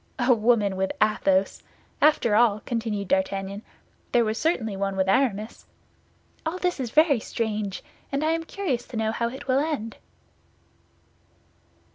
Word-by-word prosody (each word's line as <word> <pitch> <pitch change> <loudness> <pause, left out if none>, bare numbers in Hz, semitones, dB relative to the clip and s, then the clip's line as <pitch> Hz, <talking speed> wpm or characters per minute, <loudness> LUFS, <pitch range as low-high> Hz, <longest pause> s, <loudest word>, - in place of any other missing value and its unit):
A 250 0 +4
woman 215 -4 +2
with 190 0 0
Athos! 195 -2 +2 0.4
After 295 -7 +4
all," 215 -2 +4
continued 220 -4 -2
D'Artagnan, 195 +1 -1 0.5
"there 235 -1 +4
was 215 +1 -2
certainly 235 - 0
one 195 0 -2
with 190 0 +1
Aramis. 215 0 0 0.8
All 325 +3 -2
this 360 -4 -1
is 250 -3 -2
very 300 0 +4
strange; 215 -3 -3 0.3
and 280 +2 -1
I 315 - +2
am 330 0 -1
curious 310 -11 -3
to 235 - -7
know 220 0 0
how 235 +1 -1
it 265 +3 -9
will 260 +1 +3
end." 280 -7 -3
225 Hz, 145 wpm, -25 LUFS, 200-270 Hz, 0.8 s, A